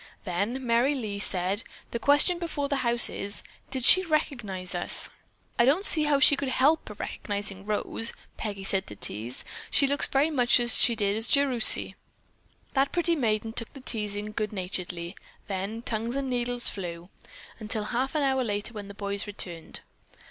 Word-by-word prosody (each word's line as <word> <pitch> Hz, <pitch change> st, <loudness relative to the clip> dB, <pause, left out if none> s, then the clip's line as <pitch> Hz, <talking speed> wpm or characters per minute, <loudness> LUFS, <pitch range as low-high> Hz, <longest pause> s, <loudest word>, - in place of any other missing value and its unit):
Then 210 Hz, +8 st, -3 dB
Merry 240 Hz, +5 st, +2 dB
Lee 215 Hz, -6 st, -4 dB
said: 190 Hz, +1 st, +1 dB, 0.3 s
"The 235 Hz, -, -3 dB
question 290 Hz, +7 st, +4 dB
before 315 Hz, -5 st, -3 dB
the 280 Hz, -1 st, -1 dB
house 240 Hz, -2 st, +5 dB
is, 200 Hz, +1 st, -5 dB, 0.3 s
did 260 Hz, -2 st, -4 dB
she 370 Hz, -, +9 dB
recognize 235 Hz, -, -2 dB
us?" 175 Hz, -, -1 dB, 0.5 s
"I 235 Hz, -, +6 dB
don't 315 Hz, +10 st, +2 dB
see 310 Hz, -2 st, +4 dB
how 290 Hz, -2 st, +2 dB
she 290 Hz, 0 st, +7 dB
could 280 Hz, 0 st, -3 dB
help 280 Hz, +3 st, +2 dB
recognizing 200 Hz, -1 st, -5 dB
Rose," 225 Hz, +2 st, +2 dB, 0.2 s
Peggy 200 Hz, -3 st, -5 dB
said, 195 Hz, 0 st, +1 dB
to 105 Hz, -, -9 dB
tease. 110 Hz, +5 st, -4 dB, 0.2 s
"She 280 Hz, -, +3 dB
looks 285 Hz, +1 st, +1 dB
very 285 Hz, +4 st, +1 dB
much 245 Hz, -4 st, +3 dB
as 240 Hz, 0 st, +4 dB
she 235 Hz, -, +3 dB
did 205 Hz, -2 st, 0 dB
as 225 Hz, +2 st, -1 dB
Jerusy." 265 Hz, -5 st, +5 dB, 0.8 s
That 275 Hz, 0 st, +1 dB
pretty 340 Hz, -1 st, +1 dB
maiden 225 Hz, -5 st, -1 dB
took 230 Hz, -1 st, -4 dB
the 275 Hz, -, -10 dB
teasing 210 Hz, -3 st, -3 dB
good 210 Hz, -1 st, -3 dB
naturedly, 180 Hz, -2 st, -5 dB, 0.3 s
then 200 Hz, +4 st, -4 dB
tongues 230 Hz, +2 st, -3 dB
and 275 Hz, -1 st, -2 dB
needles 245 Hz, 0 st, -1 dB
flew, 175 Hz, -2 st, -3 dB, 0.5 s
until 215 Hz, -1 st, -2 dB
half 255 Hz, +6 st, -2 dB
an 300 Hz, -, +1 dB
hour 265 Hz, -1 st, +1 dB
later 205 Hz, 0 st, -4 dB
when 205 Hz, -2 st, -7 dB
the 200 Hz, -, -11 dB
boys 200 Hz, 0 st, -3 dB
returned. 175 Hz, -5 st, -7 dB
230 Hz, 170 wpm, -27 LUFS, 200-270 Hz, 0.8 s, she